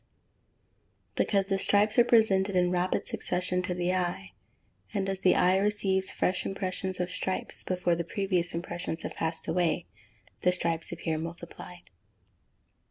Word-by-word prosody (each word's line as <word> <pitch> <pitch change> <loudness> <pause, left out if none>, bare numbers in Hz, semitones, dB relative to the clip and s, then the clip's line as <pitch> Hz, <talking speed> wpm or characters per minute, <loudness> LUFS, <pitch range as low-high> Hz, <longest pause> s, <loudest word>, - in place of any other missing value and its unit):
_ - - -39 1.1
Because 195 -2 +1
the 195 0 0
stripes 210 +3 +4
are - - +8
presented 205 -5 +3
in 180 -1 +3
rapid 180 +1 0
succession 180 0 -1
to 180 -1 -3
the 180 +1 0
eye; 175 - -2 0.6
and 195 - 0
as 195 -1 -2
the 185 -1 +4
eye 185 +1 +4
receives 195 -2 +1
fresh 185 - 0
impressions 190 -1 -3
of 180 0 -2
stripes 185 0 -3
before 180 -1 0
the 170 0 -1
previous 180 -2 0
impressions 170 -1 -2
have - - -4
passed 165 0 -3
away, 170 0 0 0.6
the 180 - +4
stripes 170 -2 -2
appear 165 -2 -2
multiplied. 170 - -9
180 Hz, 150 wpm, -29 LUFS, 175-195 Hz, 1.1 s, are